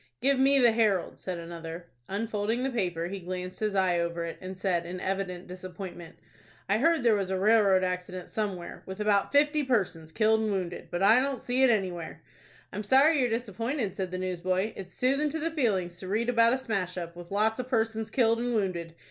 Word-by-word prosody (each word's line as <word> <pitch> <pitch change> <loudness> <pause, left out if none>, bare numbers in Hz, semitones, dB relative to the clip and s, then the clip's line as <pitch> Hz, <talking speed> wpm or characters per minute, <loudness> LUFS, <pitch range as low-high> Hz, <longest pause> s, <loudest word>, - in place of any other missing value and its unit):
"Give 275 0 +2
me 275 +1 +5
the 245 -3 +6
'Herald,'" 215 -5 +1
said 185 -2 -4
another. 170 0 -7 0.2
Unfolding 215 +3 -1
the 270 - 0
paper, 175 -8 -1
he 195 +2 -5
glanced 180 0 -6
his 215 -2 -1
eye 185 -2 +2
over 170 0 -2
it, 165 - -7
and 185 0 -7
said, 185 -2 0
in 180 +2 -6
evident 190 -1 -3
disappointment, 180 -1 -8 0.5
"I 205 +2 +2
heard 325 0 +3
there 230 -2 +5
was 195 -3 0
a 190 - 0
railroad 200 -2 +4
accident 180 0 -3
somewhere, 200 -5 -4
with 190 +2 -7
about 205 -2 +2
fifty 295 +1 +3
persons 185 - -1
killed 220 +4 +3
and 220 - 0
wounded; 180 -3 -3
but 175 +2 -2
I 220 +5 +6
don't 270 -2 -1
see 250 +3 -1
it 265 - +6
anywhere." 175 -7 -1 0.5
"I'm 210 - -3
sorry 275 +8 +5
you're 250 -2 +2
disappointed," 230 0 -2
said 190 -1 -3
the 185 - -4
newsboy. 185 +2 -1
"It's 185 -2 -9
soothin' 275 +4 +1
to 320 +2 -3
the 330 +2 -1
feelings 190 - 0
to 185 - -7
read 220 +5 0
about 230 -1 +4
a - - +2
smash 195 -8 -3
up, 170 -1 -5
with 175 0 -10
lots 215 +3 +1
of 255 0 -4
persons 225 -2 0
killed 230 -2 +2
and 240 0 -1
wounded. 170 -5 -2
200 Hz, 205 wpm, -28 LUFS, 180-235 Hz, 0.5 s, the